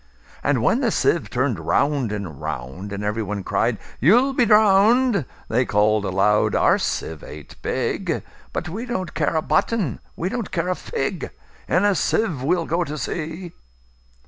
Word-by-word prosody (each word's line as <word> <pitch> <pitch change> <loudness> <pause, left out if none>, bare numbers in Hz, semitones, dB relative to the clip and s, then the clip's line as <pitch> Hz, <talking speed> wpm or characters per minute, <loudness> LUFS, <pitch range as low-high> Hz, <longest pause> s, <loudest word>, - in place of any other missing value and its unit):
And - - +1
when - - +3
the - - +2
sieve - - +1
turn'd - - 0
round 140 -6 +1
and 100 -9 -5
round, 65 +11 -5
And 100 0 -4
every 105 +2 -1
one 105 -1 -4
cried, - - 0 0.2
"You 175 - +6
'll 270 +2 0
be 245 -3 +2
drown'd!"They 210 - +3
call'd 105 0 +2
aloud, 95 +3 +2
"Our - - +4
sieve 80 -2 -3
ain't 75 -1 -11
big:But - - -3
we 220 +10 -5
don't 185 -8 -3
care 155 +1 0
a 160 - +1
button; 165 - 0 0.2
we 170 - -2
don't 225 +1 -3
care 180 - -1
a 185 - +1
fig:In 205 - -3
a 205 - +4
sieve 180 - 0
we 155 +7 +2
'll 165 - -2
go 170 +2 0
to 150 -2 -5
sea!" 165 +3 -4
155 Hz, 165 wpm, -22 LUFS, -, 0.2 s, You